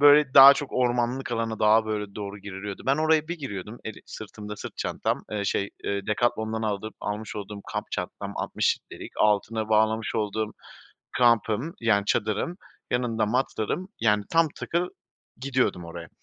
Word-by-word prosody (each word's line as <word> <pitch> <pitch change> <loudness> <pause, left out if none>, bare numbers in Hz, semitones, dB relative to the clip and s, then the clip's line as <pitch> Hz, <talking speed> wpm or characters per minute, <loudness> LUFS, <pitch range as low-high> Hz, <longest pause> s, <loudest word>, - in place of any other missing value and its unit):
Böyle, 145 -2 +7
daha 140 0 +11
çok 145 - -5
ormanlık 125 0 0
alana, 115 -1 -2
daha, 110 +1 +5
böyle, 105 -2 -3
doğru 100 -1 -6
giriliyordu. 100 0 -7
Ben 135 +2 +3
oraya 155 0 +2
bir 175 -1 -4
giriyordum, 105 -4 -6
eli 110 - -7
sırtımda 105 0 -8
sırt - - -8
çantam, - - -1
eee, 105 -1 -2
şey, 100 0 0
eee, 100 -1 -2
Decathlon'dan 110 0 0
aldığım 110 0 -2
almış 105 +1 -4
olduğum 105 0 -6
kamp 105 +1 -4
çantam 100 +2 -4
-altmış - - 0
litrelik - - -9
altına 105 +1 +2
bağlamış 110 0 +2
olduğum 110 0 -1 0.7
kampım, 115 - +3
yani, 110 -3 +3
çadırım, 110 - 0 0.3
yanında 115 -3 +1
matlarım, 125 - -1
yani 105 -2 +3
tam 165 -1 +4
takır 175 +2 -1 0.5
gidiyordum 130 -9 0
oraya. 85 0 -8
110 Hz, 150 wpm, -26 LUFS, 105-125 Hz, 0.7 s, daha